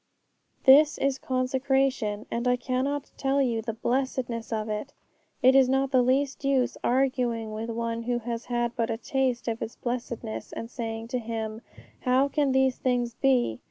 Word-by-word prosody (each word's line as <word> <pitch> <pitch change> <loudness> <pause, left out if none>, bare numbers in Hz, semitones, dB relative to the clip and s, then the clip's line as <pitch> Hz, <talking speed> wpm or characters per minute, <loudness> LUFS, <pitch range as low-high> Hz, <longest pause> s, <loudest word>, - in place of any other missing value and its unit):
This 290 +3 +7
is 270 -1 0
consecration, 260 -4 0
and 235 +2 -1
I 250 - +4
cannot 260 +3 -2
tell 275 0 +1
you 235 -4 +1
the 225 0 -4
blessedness 245 -1 -2
of 215 -1 -2
it. 215 +6 -4 0.5
It 260 +1 +7
is 265 -1 +5
not 270 0 +1
the 255 -2 +5
least 270 +3 +1
use 270 -2 +1
arguing 245 -3 +1
with 220 +2 -4
one 230 0 -2
who 240 +1 -1
has 235 0 -4
had 240 -1 -1
but 230 0 0
a 225 - -1
taste 255 0 -1
of 230 -1 -2
its 225 - -5
blessedness, 240 -2 -5
and 230 +1 -6
saying 225 -1 -5
to 250 0 -1
him, 220 -1 -4 0.4
'How 260 +2 +2
can 285 -1 +1
these 265 -1 +2
things 245 -2 0
be?' 245 - +1
245 Hz, 170 wpm, -27 LUFS, 230-265 Hz, 0.5 s, This